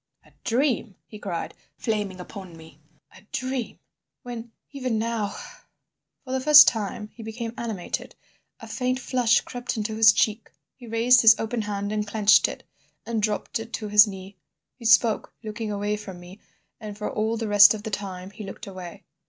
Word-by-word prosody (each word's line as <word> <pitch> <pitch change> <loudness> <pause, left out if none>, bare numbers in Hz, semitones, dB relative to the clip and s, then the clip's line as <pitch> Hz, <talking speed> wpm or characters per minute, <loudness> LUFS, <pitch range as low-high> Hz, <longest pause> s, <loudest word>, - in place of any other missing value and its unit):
"A - - -22
dream!" 245 -4 0
he 215 - -12
cried, 185 -5 -5 0.2
flaming 205 -4 -3
upon 180 -2 -10
me, 160 -2 -15 0.4
"a 190 - -15
dream—when, 245 -2 -7 0.2
even 255 -5 -2
now—" 220 -2 -2 0.9
For 255 - -9
the 260 - 0
first 295 +1 +9
time 210 -1 -1
he 235 - -12
became 225 +1 -6
animated. 220 -7 -5 0.4
A - - -10
faint 255 0 -2
flush 245 -3 +2
crept 245 0 -5
into 215 0 -2
his 220 -1 +7
cheek. 215 +1 0 0.2
He 245 -2 -14
raised 230 +3 +4
his 225 0 +8
open 225 +1 -2
hand 205 -1 -4
and 210 -1 -2
clenched 210 0 +4
it, - - -8 0.4
and 230 -2 -2
dropped 215 +4 -2
it 225 +1 -9
to 215 -3 -4
his 210 +1 +7
knee. 195 0 -9 0.4
He 235 - -14
spoke, 225 0 +3
looking 215 0 -5
away 205 +1 -1
from 190 -4 -9
me, 180 +3 -13 0.4
and 210 -1 -8
for 210 - -4
all 220 +2 -1
the 225 -1 -3
rest 205 +1 +7
of 210 - -9
the 220 - -5
time 190 -2 -5
he 210 +2 -9
looked 195 +3 -9
away. 185 -3 -9
215 Hz, 175 wpm, -25 LUFS, 205-235 Hz, 0.9 s, first